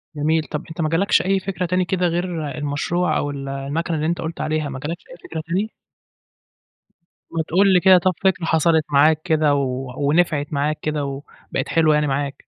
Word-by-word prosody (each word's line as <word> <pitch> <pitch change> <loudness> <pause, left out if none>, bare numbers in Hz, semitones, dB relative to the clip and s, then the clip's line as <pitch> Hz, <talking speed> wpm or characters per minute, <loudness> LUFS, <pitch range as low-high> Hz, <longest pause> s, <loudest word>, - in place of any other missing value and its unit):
جميل، 155 +2 +1
طَب 150 +3 -5
أنت 165 +1 -5
ما 155 - +1
جالكش 175 +5 +3
أي 195 +1 +1
فكرة 185 -1 -3
تاني 180 +1 +1
كده 180 0 0
غير 170 -2 -2
المشروع 150 +5 -1
أو 145 - -1
ال 140 -1 -6
الماكينة 145 +5 -2
اللي 155 +1 -1
أنت 170 - -1
قُلت 165 +1 -5
عليها 155 -2 -1
ما 130 -1 -6
جالكش 160 +5 -5
أي - - -11
فكرة 160 - -5
تاني؟ 195 +6 -1 1.6
ما 160 -1 -2
تقُل 190 +3 +4
لي 180 - +6
كده 185 0 +7
طَب 185 +1 +2
فكرة 190 -3 +2
حصلت 160 -1 +2
معاك 150 +2 +4
كده، 155 -3 +2
و 130 -2 -2
ونفعت 150 0 +1
معاك 145 +2 0
كده 150 -2 -2
وبقِت 140 +1 -6
حلوة 160 -2 +3
يعني 150 0 +1
معاك؟ 140 0 -1
160 Hz, 190 wpm, -21 LUFS, 145-175 Hz, 1.6 s, كده